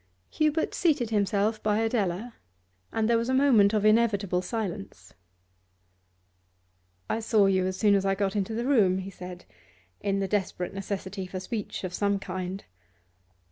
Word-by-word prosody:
Hubert 310 +1 +1
seated 285 -10 +1
himself 210 +1 +1
by 210 -1 +1
Adela, 225 -1 -1 0.6
and 220 -1 0
there 230 0 +3
was 230 +2 -2
a 260 - +2
moment 245 -8 +5
of 215 -1 +1
inevitable 210 -5 +3
silence. 180 - -5 1.9
'I 225 - -1
saw 220 -2 +3
you 190 -1 +2
as 185 0 -3
soon 210 -1 +4
as 195 -1 +3
I 195 0 +1
got 195 0 -1
into 205 +2 -1
the 235 +2 -2
room,' 210 -9 +4
he 190 +1 -5
said, 180 -1 -9 0.5
in 200 -1 -1
the 195 - -1
desperate 190 -2 -2
necessity 195 -1 -5
for 185 +1 -5
speech 210 +2 -5
of 185 -1 -4
some 200 0 +1
kind. 185 0 -5
200 Hz, 155 wpm, -27 LUFS, 190-225 Hz, 1.9 s, moment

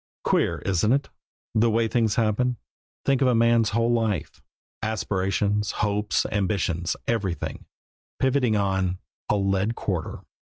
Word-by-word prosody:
Queer, - - +2
isn't 100 +5 +2
it 140 +1 0 0.4
the 115 +1 +3
way 115 +1 +2
things 110 -3 +1
happen? 120 +2 +1 0.5
Think 135 -1 +2
of 135 - +4
a 125 - +3
man's 115 -1 +4
whole 115 +2 +1
life, 110 -8 -1 0.4
aspirations, 105 -1 0
hopes, 105 0 0
ambitions, 90 -4 0
everything, 100 -7 -2 0.5
pivoting 130 -4 +2
on 95 -2 0 0.3
a - - +3
lead 100 +2 +1
quarter! 90 -6 -3
105 Hz, 125 wpm, -25 LUFS, 100-115 Hz, 0.5 s, of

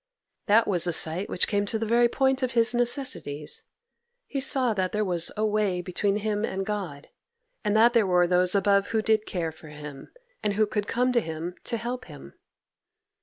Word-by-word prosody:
That 225 +2 +4
was 180 -3 +1
a 175 - 0
sight 165 +5 +2
which - - 0
came 205 -1 -1
to 220 - 0
the 225 - -3
very 235 +2 +3
point 265 +1 +1
of 255 -1 -1
his 235 0 +3
necessities; 240 - 0 0.6
he 275 - -4
saw 260 -3 +4
that 185 -2 -2
there 210 0 0
was 175 -3 0
a 215 - +1
way 210 -4 0
between 190 +3 -1
him 210 0 -2
and 195 -3 -3
God, 185 -9 -5 0.5
and 210 -1 0
that 235 +2 +5
there 225 -5 +3
were 180 -1 +3
those 180 +1 +2
above 200 0 +2
who 220 -1 -1
did 220 -1 +1
care 170 -3 -3
for 160 0 -15
him, 150 -2 -10 0.3
and 210 - 0
who 215 +2 +2
could 210 0 -3
come 250 +1 +1
to 240 -1 +2
him 160 +1 -6
to 235 - -2
help 240 +3 -5
him. - - -12
205 Hz, 200 wpm, -26 LUFS, 180-230 Hz, 0.6 s, that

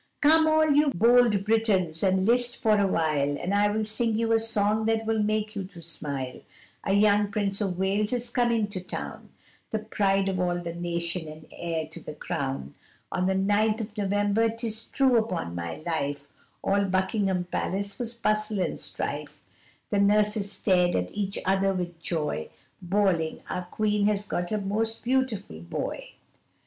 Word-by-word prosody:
Come 315 +2 +6
all 315 0 +4
you 295 +1 +4
bold 230 -1 +4
Britons, 200 -7 +1
and 190 -1 +2
list 240 +2 +2
for 215 -1 +3
awhile, 155 -7 +1
And 185 - -2
I 205 0 +3
will 215 +1 -1
sing 220 +1 0
you 230 0 0
a 225 - +5
song 220 -1 +1
that 225 0 +1
will 220 -1 +1
make 215 +1 -1
you 200 - -2
to 180 -2 -12
smile, 140 -5 -5 0.4
A 195 - 0
young 205 0 +4
Prince 200 -1 0
of 190 -4 -1
Wales 200 +3 +1
is 245 -1 -2
come 235 -3 +2
to 205 -3 -6
town, 180 - -7 0.4
The 220 - -1
pride 195 -2 +1
of 190 -2 -1
all 175 -1 +1
the 170 -1 -5
nation, 170 -1 -3
and 155 0 -10
heir 165 -2 -3
to 155 - -7
the 150 - -7
crown, 135 - -4 0.4
On 185 0 0
the 190 - +1
ninth 210 +3 +2
of 215 -1 -6
November, 205 +2 +1
'tis 225 -1 -3
true 260 -4 +3
'pon 85 +1 -3
my 85 -1 -4
life, 145 -4 -2 0.4
All 200 0 +2
Buckingham 190 0 0
Palace 200 +3 -3
was 235 -1 -3
bustle 215 -2 0
and 180 - -1
strife, - - -5 0.5
The 205 - +2
nurses 210 0 +3
stared 180 -3 +2
at 90 0 -1
each 200 -1 -2
other 195 +1 +2
with 175 -2 -4
joy, 150 - -2 0.3
Bawling, 180 -3 0
our 180 -1 -3
queen 210 +2 0
she - - +5
has 205 -1 0
got 175 -2 -3
a 215 - +1
most 215 +3 -1
beautiful 240 - -1
boy. 85 +1 -5
200 Hz, 175 wpm, -27 LUFS, 175-220 Hz, 0.5 s, Come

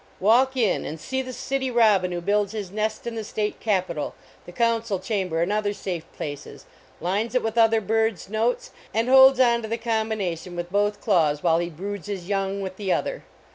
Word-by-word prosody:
\Yalk 255 +6 +4
in 225 -6 +2
and 155 - -6
see 260 +11 -2
the 255 -1 -6
City 265 +1 -2
Robin, 210 -7 +3
who 175 -1 -3
builds 205 +2 +1
his 205 -4 -5
nest 215 +1 -2
in 235 - -3
the 225 -1 -4
state 210 0 -3
capitol, 185 -8 -1 0.3
the - - -8
council 230 0 0
cham 190 0 -2
ber 165 0 0
and 180 - -1
other 210 -1 0
safe 180 -5 -5
places, 145 -2 -7 0.3
lines 205 +7 -1
it 250 - +2
with 225 0 -2
other 225 -1 +5
birds 220 -1 0
notes, 220 +4 -1 0.2
and 225 +2 +1
holds 265 0 +8
onto 235 -3 +3
the 230 - -1
combination 220 -7 -2
with 175 0 -5
both 205 +1 +1
claws 160 -8 +2
while 165 -1 +3
he 175 0 -2
broods 195 +4 -6
his 190 -4 -5
young 195 0 -1
with 190 -1 -6
the 195 -3 -2
other. - - -1
210 Hz, 200 wpm, -24 LUFS, 185-230 Hz, 0.3 s, holds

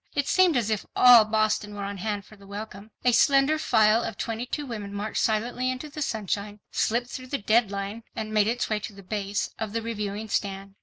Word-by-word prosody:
It 285 0 0
seemed 365 -6 +4
as 225 -2 0
if 215 - -1
all 245 -3 +8
Boston 215 -1 0
were 200 - -5
on 200 0 -4
hand 205 0 -3
for 215 - -15
the 200 -1 -17
welcome. 205 0 -8 0.2
A 250 - +6
slender 275 +4 +4
file 220 -5 +4
of 225 - -5
twenty 230 +1 -3
two 295 +2 -3
women 210 -5 -6
marched 210 +2 -2
silently 240 +4 0
into 255 +4 -4
the 300 +1 -7
sunshine, 210 -4 -3
slipped 235 +2 +1
through 255 0 -7
the 280 - -2
"deadline," 205 -1 0
and 215 0 -4
made 210 -1 +3
its 240 +2 0
way 215 -1 0
to 210 - -7
the 195 0 -13
base' 205 +1 -2
of 220 -2 -4
the 230 - -1
Reviewing 210 -1 -4
stand. 195 -1 -3
215 Hz, 215 wpm, -26 LUFS, 205-240 Hz, 0.2 s, all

